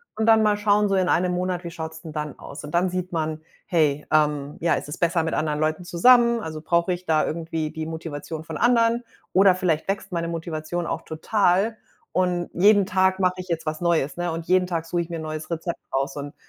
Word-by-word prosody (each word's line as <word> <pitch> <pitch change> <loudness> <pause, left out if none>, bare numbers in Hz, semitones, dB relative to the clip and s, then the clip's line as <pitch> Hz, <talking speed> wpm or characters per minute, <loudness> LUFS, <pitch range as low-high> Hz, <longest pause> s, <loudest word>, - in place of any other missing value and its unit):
und 220 0 0
dann 220 -1 +6
mal 210 -1 +3
schauen 210 0 +3
so 195 - +1
in 185 -1 +2
einem 180 +1 +2
Monat, 180 0 -2
wie 170 - -6
schaut's 160 -1 -7
denn 160 -3 -9
dann 150 -2 -4
aus? 140 - -9
Und 150 - -8
dann 180 +2 +2
sieht 180 0 -4
man, 155 -1 -2 0.2
hey, 150 -4 +1
ähm 150 -2 +1
ja, 170 0 +2
ist - - -5
es - - -5
besser 170 -1 +2
mit 160 - -2
anderen 150 -1 -1
Leuten 155 +3 0
zusammen? 235 +6 +5
Also, 155 -4 -6
brauche 170 +2 +1
ich 180 +1 -7
da 155 -1 +2
irgendwie 160 -1 -3
die 160 -1 -5
Motivation 160 -1 -6
von 160 -2 -6
anderen? 235 0 +3 0.3
Oder 190 0 +6
vielleicht 165 -3 0
wächst 195 0 -3
meine 170 -1 -2
Motivation 165 0 -4
auch - - -3
total 195 +5 +1 0.4
und 180 -1 0
jeden 200 +1 +5
Tag 190 0 +2
mache 180 -1 +3
ich 185 0 -7
jetzt 165 -2 -2
was 155 0 -2
Neues, 165 -4 +1
ne? 175 -1 -1
Und 165 0 -5
jeden 185 0 +4
Tag 165 -2 -2
suche 170 +1 -1
ich 170 - -6
mir 170 - -4
'n - - -5
neues 155 +1 -5
Rezept 170 +1 -3
raus 135 +1 -1
und 145 0 -6
170 Hz, 230 wpm, -24 LUFS, 155-185 Hz, 0.4 s, dann